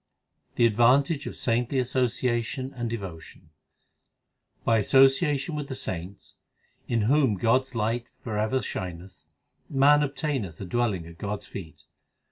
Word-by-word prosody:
The 120 - +4
advantage 135 +7 +3
of - - -6
saintly 120 +3 0
association 125 0 -1
and 120 -2 -3
devo 95 -8 -5
tion: 80 0 -16 1.1
By 115 -1 +4
association 135 - +3
with 150 -2 -4
the 135 - -5
saints, 95 -2 -6 0.5
in 115 -2 +1
whom 130 0 +3
God 115 +6 +3
s 130 -1 -15
light 115 +2 -1
for 110 -3 -4
ever 110 +5 0
shineth, 90 0 -6 0.4
Man 145 +2 +5
obtaineth 140 - -2
a 100 - -5
dwelling 105 -4 -1
at 85 +1 -13
God 105 0 -3
s - - -11
feet. 80 -5 -9
120 Hz, 140 wpm, -26 LUFS, 100-135 Hz, 1.1 s, Man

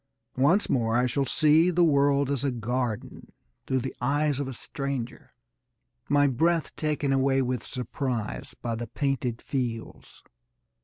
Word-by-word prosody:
Once 170 +10 +4
more 115 -2 +1
I 125 - +3
shall 135 +2 0
see 155 +6 +4
the 175 0 +3
world 140 -2 +3
as 140 -1 0
a 140 - +2
garden 120 -1 -3 0.4
through 130 -1 +1
the - - -5
eyes 145 +2 +1
of 140 - -2
a - - -4
stranger, 135 -1 -5 0.7
my 145 0 +4
breath 160 +5 +1
taken 150 -3 0
away 135 0 +2
with 125 0 -2
surprise 125 -2 -4
by 115 - -3
the 115 +1 -4
painted 125 -2 -2
fields. 120 -4 -5
135 Hz, 145 wpm, -27 LUFS, 125-145 Hz, 0.7 s, Once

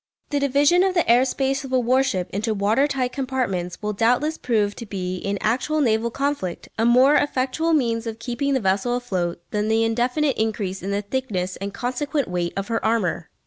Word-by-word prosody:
The 290 - +1
division 285 +5 +3
of 380 0 +1
the 345 - +2
air 245 +3 +5
space 270 +1 -1
of 265 - -8
a 260 - +3
warship 245 -7 +1
into 215 +2 -1
water 215 +8 +2
tight 260 -3 -1
compartments 250 -11 -2
will 210 0 -1
doubtless 245 +9 +1
prove 210 -4 0
to 230 - -6
be, 185 -2 -3
in 200 +2 -2
actual 255 +8 0
naval 230 -4 +2
conflict, 275 -8 -3
a 225 - +3
more 255 +4 +6
effectual 290 +3 +1
means 235 -5 +1
of 225 -1 -4
keeping 245 +4 -1
the - - +2
vessel 200 +4 +1
afloat 180 -8 -3
than 210 0 0
the 220 +1 +2
indefinite 245 +5 0
increase 210 -4 -2
in 190 - -4
the 200 +1 -1
thickness 200 -6 -2
and 200 +1 -5
consequent 275 +3 -2
weight 175 -1 -2
of 195 0 -2
her 225 -1 -1
armour. 200 -7 0
235 Hz, 195 wpm, -23 LUFS, 200-270 Hz, -, more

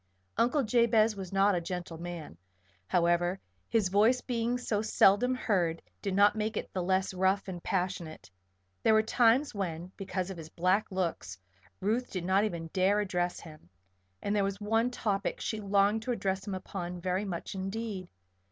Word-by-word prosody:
Uncle 265 +4 +2
Jabez 225 -2 +3
was 190 -3 -7
not 195 +1 +4
a 175 - 0
gentle 175 -1 -5
man, 170 - -7 0.5
however; 175 - +2 0.3
his 220 -5 +2
voice 220 +6 +4
being 240 0 -1
so 220 -4 -1
seldom 220 +3 +4
heard 175 -9 0 0.2
did 195 -2 -2
not 205 +1 +5
make 215 0 -2
it - - -5
the 185 - -1
less 190 +2 +1
rough 190 +2 +1
and 180 -2 -6
passionate. 180 -3 -3 0.5
There 220 - +4
were 220 - +4
times 240 +5 +3
when, 180 -3 -4
because 190 -1 -3
of 190 - -7
his 160 -1 -9
black 185 +5 +1
looks, 170 - -2 0.4
Ruth 225 +6 0
did 180 -3 -4
not 195 +3 +3
even 165 -5 -4
dare 195 +2 +3
address 180 -3 -1
him. 155 - -13 0.5
And 205 - 0
there 205 - +2
was 195 0 -2
one 225 +3 +1
topic 205 -5 -2
she 220 -1 -3
longed 200 +2 +2
to 250 +3 -3
address 195 -4 -2
him 195 - -2
upon 180 -1 -5
very 185 +2 -1
much 180 -1 -5
indeed. 195 0 -4
195 Hz, 170 wpm, -30 LUFS, 180-215 Hz, 0.5 s, not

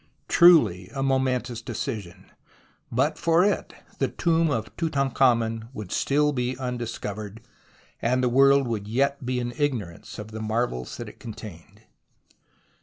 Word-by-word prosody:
Truly 115 - +5
a 135 - -1
momentous 130 -3 0
decision. 105 -6 -6 0.6
But - - +1
for 170 +2 +4
it 205 - -1 0.2
the - - +2
tomb 165 -1 +1
of 110 -6 -3
Tutankhamen 125 -7 +1
would 105 -3 -7
still 150 +1 +2
be 125 -1 -2
undiscovered, 115 -4 -5 0.6
and 125 +2 +1
the - - +3
world 135 +2 +5
would 105 -3 -3
yet 140 +5 0
be 125 0 -1
in 120 0 -3
ignorance 115 - -3
of 105 0 -8
the 110 0 -6
marvels 110 - -2
that - - -6
it - - -12
contained. 105 -7 -10
125 Hz, 135 wpm, -25 LUFS, 110-135 Hz, 0.6 s, Truly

